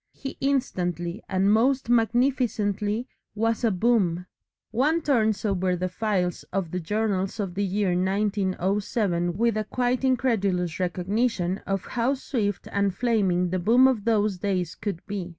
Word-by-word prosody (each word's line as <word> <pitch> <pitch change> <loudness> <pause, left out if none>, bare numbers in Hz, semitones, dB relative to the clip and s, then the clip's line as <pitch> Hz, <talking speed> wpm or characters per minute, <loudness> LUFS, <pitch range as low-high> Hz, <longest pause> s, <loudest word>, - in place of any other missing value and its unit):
He 270 - -7
instantly 180 - -1
and 195 +2 +3
most 255 +4 +2
magnificently 230 -2 +1 0.3
was 225 +2 0
a 230 - +4
Boom. 185 -4 +1 0.5
One 300 +8 +1
turns 220 -7 +1
over 185 -3 +1
the 185 +1 -2
files 185 -3 -1
of 185 -5 -2
the 180 - -2
journals 200 +2 -1
of 195 -4 -2
the 200 +2 -1
year 200 0 0
1907 190 -1 0
with 230 0 +2
a 215 - 0
quite 250 +3 -1
incredulous 200 -10 +1
recognition 185 +1 0
of 195 -2 -2
how 250 +3 0
swift 220 -7 -2
and 200 -2 0
flaming 190 -6 +1
the 185 - 0
boom 240 +8 +5
of 240 -6 0
those 210 -4 +1
days 180 -4 -1
could 200 -5 -5
be. 195 -3 -4
205 Hz, 145 wpm, -25 LUFS, 185-230 Hz, 0.5 s, boom